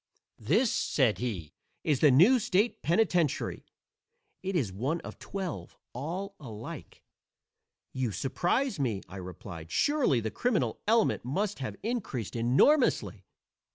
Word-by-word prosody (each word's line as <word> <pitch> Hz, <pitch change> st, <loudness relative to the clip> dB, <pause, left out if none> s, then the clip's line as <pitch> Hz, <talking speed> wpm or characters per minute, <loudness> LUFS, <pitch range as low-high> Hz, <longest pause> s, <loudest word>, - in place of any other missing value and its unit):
"This," 210 Hz, -, +2 dB
said 130 Hz, -7 st, +1 dB
he, 100 Hz, -11 st, -4 dB, 0.3 s
"is 145 Hz, -4 st, +1 dB
the 150 Hz, -, +6 dB
new 180 Hz, -, +6 dB
state 210 Hz, +2 st, +1 dB
penitentiary. 170 Hz, -2 st, +1 dB, 0.7 s
It 190 Hz, 0 st, -3 dB
is 120 Hz, -, 0 dB
one 135 Hz, -, -1 dB
of -, -, -9 dB
twelve, 190 Hz, -5 st, -5 dB, 0.2 s
all 180 Hz, +10 st, -4 dB
alike." 110 Hz, -7 st, -9 dB, 0.9 s
"You 130 Hz, -4 st, -1 dB
surprise 175 Hz, -, 0 dB
me," 115 Hz, -8 st, -1 dB
I 95 Hz, -, -9 dB
replied. 90 Hz, -2 st, -8 dB
"Surely 285 Hz, -, +2 dB
the 110 Hz, -1 st, -3 dB
criminal 200 Hz, -, 0 dB
element 225 Hz, 0 st, +3 dB
must 190 Hz, -, -2 dB
have 115 Hz, -6 st, -4 dB
increased 200 Hz, -, -3 dB
enormously." 130 Hz, -, +3 dB
145 Hz, 120 wpm, -29 LUFS, -, 0.9 s, the